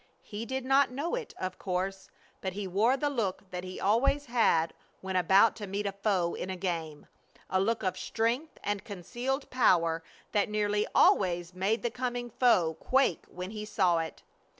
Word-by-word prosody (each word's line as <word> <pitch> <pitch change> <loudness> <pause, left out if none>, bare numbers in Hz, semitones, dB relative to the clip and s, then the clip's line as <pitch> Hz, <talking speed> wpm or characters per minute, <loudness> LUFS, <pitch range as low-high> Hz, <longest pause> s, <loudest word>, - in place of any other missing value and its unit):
He 215 +2 -6
did 265 0 -3
not 270 +1 +4
know 285 +7 -3
it, 480 -2 -4
of 185 0 -4
course, 190 +1 -3 0.3
but 190 -1 -3
he 200 0 -4
wore 220 +8 +2
the 290 - 0
look 205 -8 -2
that 180 0 -4
he 185 0 -7
always 245 +8 +2
had 225 -9 +2 0.3
when 190 0 -4
about 190 +5 +5
to 205 - -6
meet 200 +2 -3
a 200 - 0
foe 195 -3 0
in 185 - -5
a 190 - -2
game 165 -5 -4 0.5
a 185 - +3
look 225 +3 0
of 185 -1 -1
strength 240 +8 -1
and 205 -1 -2
concealed 240 - -4
power 170 -10 +3 0.3
that 205 0 +1
nearly 210 0 0
always 175 -2 +3
made 195 +5 0
the 240 - 0
coming 245 -1 -3
foe 185 -10 +3
quake 265 -10 +2
when 180 +2 -6
he 210 -1 -5
saw 180 -5 +2
it. 160 -1 -5
205 Hz, 180 wpm, -30 LUFS, 185-240 Hz, 0.5 s, about